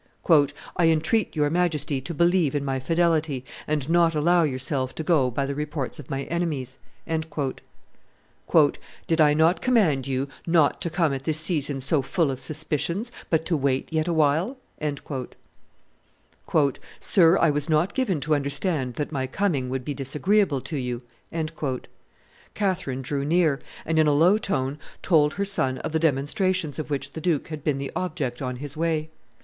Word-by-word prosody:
"I 170 -2 +4
entreat 165 +8 +1
your 145 -1 +1
Majesty 155 -5 0
to 155 - -5
believe 170 -3 +3
in 140 -1 -1
my 135 -1 -1
fidelity, 160 -2 +1 0.2
and 150 -3 -1
not 165 -1 +3
allow 170 +4 +4
yourself 130 -2 -1
to 160 - -4
go 150 -6 +3
by 135 +3 -1
the 140 - -3
reports 150 -2 -4
of 140 - -10
my 135 -1 -2
enemies." 150 -7 -3 0.3
"Did 160 -1 -1 1.9
I 150 -1 +5
not 160 +3 +3
command 175 - +2
you 135 +1 -1 0.2
not 165 -4 +3
to 170 - -1
come 160 -3 +1
at 135 0 -5
this 155 -1 +2
season 145 -4 0
so 140 +2 +2
full 150 +2 0
of 130 - -5
suspicions, 160 - -3 0.2
but 160 -1 +1
to 170 - +1
wait 135 +1 -1
yet 160 +1 +1
a - - +1
while?" 160 - +2 2.4
"Sir, 175 -3 +4
I 165 - +4
was 145 +1 -2
not 160 +4 +2
given 220 - 0
to 155 +2 +1
understand 140 -2 -1
that 150 - -3
my 130 -3 -2
coming 140 -5 -1
would 130 -1 -3
be 145 - -2
disagreeable 150 +4 +1
to 155 - -5
you." 125 -2 -3 1.5
Catherine 185 -10 -1
drew 140 +1 -2
near, 155 -2 +2 0.3
and, 160 0 +1
in 155 - +4
a 150 - +4
low 175 +8 +5
tone, 140 -8 -2 0.2
told 155 -4 +4
her 200 - -1
son 135 -10 +1
of - - -4
the 160 - +1
demonstrations 160 +2 0
of 155 - -4
which 140 -1 -3
the 160 - -6
duke 165 -3 0
had 155 -3 -6
been 145 -3 +1
the 140 0 -4
object 150 -9 -3
on 125 -1 -3
his 145 +3 -6
way. 160 -1 -1
150 Hz, 165 wpm, -25 LUFS, 135-170 Hz, 2.4 s, I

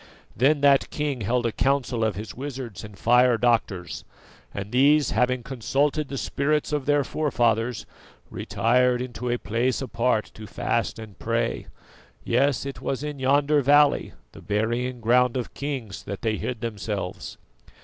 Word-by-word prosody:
Then 140 +5 +3
that 140 -1 +4
king 145 -5 -2
held 120 +4 0
a 115 - +1
council 130 -2 0
of 110 -3 0
his 105 +2 -6
wizards 130 -6 -6
and 105 -2 -11
fire 125 +2 +4
doctors, 110 -7 0 0.5
and 100 +1 -6
these 145 +4 +4
having 125 0 +1
consulted 135 +4 0
the 135 - -5
spirits 150 +3 -1
of 145 -2 -1
their 145 -1 +3
forefathers, 120 -5 0 0.5
retired 125 +1 +1
into 125 -1 -4
a 120 - +1
place 120 +3 -1
apart 120 -3 0
to 110 0 -10
fast - - -1
and 110 -3 -11
pray; 115 +1 -1 0.6
yes, 135 +2 +1
it 140 - -6
was 135 +1 -3
in 150 -2 -5
yonder 145 +2 +3
valley, 145 +2 +4 0.2
the - - -13
burying 120 +4 -1
ground 125 +2 +3
of 125 - -4
kings, 135 -8 -5
that 100 - -6
they 110 -2 0
hid 125 -3 -4
themselves. 105 -4 -4
125 Hz, 150 wpm, -25 LUFS, 115-140 Hz, 0.6 s, that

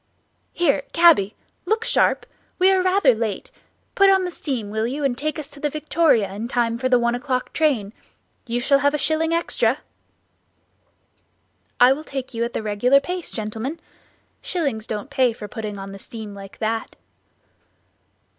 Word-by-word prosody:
"Here, 290 -5 +2
cabby! 320 - +5 0.3
look 445 +1 0
sharp, - - +2 0.3
we 370 +1 +5
are 380 -1 +3
rather 370 -7 +4
late; 220 -3 -4 0.4
put 395 0 +5
on 380 -1 +4
the 360 - -3
steam, 250 -11 -4
will 220 +1 -1
you, 280 +4 -4
and 270 -3 +1
take 305 +4 -3
us 305 -3 -6
to 290 - -14
the 295 - 0
Victoria 300 - +1
in 215 +4 -4
time 235 -1 0
for 255 0 0
the 250 - +5
one 235 0 +1
o'clock 255 0 -2
train? 250 -10 +1 0.5
You 240 +1 -1
shall 275 +3 +3
have 285 +1 +2
a - - +1
shilling 315 +3 +1
extra." 335 0 +1 2.0
"I 250 +2 +7
will 300 +3 -7
take 270 -3 -6
you 230 0 -1
at 235 - -3
the - - -3
regular 215 +6 +3
pace, 360 +4 -5
gentlemen; 225 +8 -5 0.6
shillings 275 - -2
don't 215 +6 -5
pay 255 -4 +2
for 210 -2 -8
putting 210 -1 -6
on 195 0 -7
the 195 - -9
steam 215 0 -8
like 195 -1 -11
that." 225 0 -2
255 Hz, 170 wpm, -22 LUFS, 220-310 Hz, 2.0 s, I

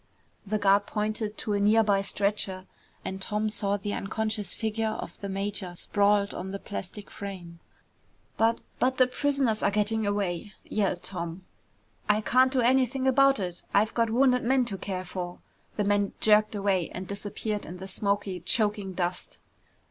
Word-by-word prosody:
The 215 +2 +1
guard 200 0 +3
pointed 215 0 -2
to 210 - -2
a 205 - +1
near 215 +2 +5
by 200 -2 +3
stretcher 195 -1 -1 0.4
and 190 0 -4
Tom 210 +2 -1
saw 205 -1 0
the 205 +1 -4
unconscious 215 -1 -2
figure 220 0 -1
of - - -7
the 200 - -4
major 195 -2 -3
sprawled 205 +2 +2
on 185 +2 -5
the 200 - -4
plastic 200 0 -7
frame. 180 -4 -8 0.8
"But 225 +1 +2 0.2
but 260 +1 +2
the 255 - +6
prisoners 265 -3 +1
are - - +3
getting 210 +1 +1
away!" 200 -1 -2
yelled 195 -4 -1
Tom. 175 0 -5 0.6
"I 210 0 +4
can't 255 +4 +4
do 260 -2 +2
anything 260 +2 +2
about 275 -1 +5
it. 180 -2 -4
I've 215 +2 +3
got 230 -1 +2
wounded 250 +2 +4
men 255 +1 +2
to 200 -5 -4
care 185 -1 -4
for!" 180 -1 -5 0.4
The 210 - 0
man 205 0 +1
jerked 215 0 +4
away 195 -4 +1
and 185 +1 -6
disappeared 205 +1 -4
in 175 +3 -7
the 190 +1 -7
smoky, 200 -1 -1
choking 205 +1 +1
dust. 180 0 -3
205 Hz, 165 wpm, -28 LUFS, 195-220 Hz, 0.8 s, the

